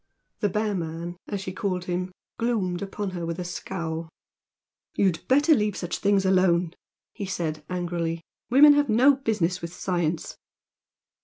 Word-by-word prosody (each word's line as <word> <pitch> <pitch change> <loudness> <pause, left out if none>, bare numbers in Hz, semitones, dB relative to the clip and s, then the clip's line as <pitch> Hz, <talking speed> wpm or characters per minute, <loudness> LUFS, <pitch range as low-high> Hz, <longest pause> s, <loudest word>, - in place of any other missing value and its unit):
The 205 - +1
bear 210 +2 0
man, 170 -1 -4
as 200 -2 -3
she 185 - -5
called 185 -2 -2
him, 180 +1 -2 0.3
gloomed 205 -7 0
upon 200 0 -4
her 175 -2 -5
with 165 0 -3
a 180 - -3
scowl. 165 -2 -4 0.9
"You'd 185 -5 +2
better 290 +5 +5
leave 210 -7 +1
such 175 -1 -3
things 200 -1 +2
alone!" 180 -2 +3 0.4
he 200 - -5
said, 160 -5 -3
angrily 170 -2 -2 0.3
"Women 290 +4 +8
have 290 -3 +2
no 260 +5 +5
business 190 -8 0
with 170 0 -5
science." 175 -4 -2
185 Hz, 150 wpm, -26 LUFS, 170-210 Hz, 0.9 s, Women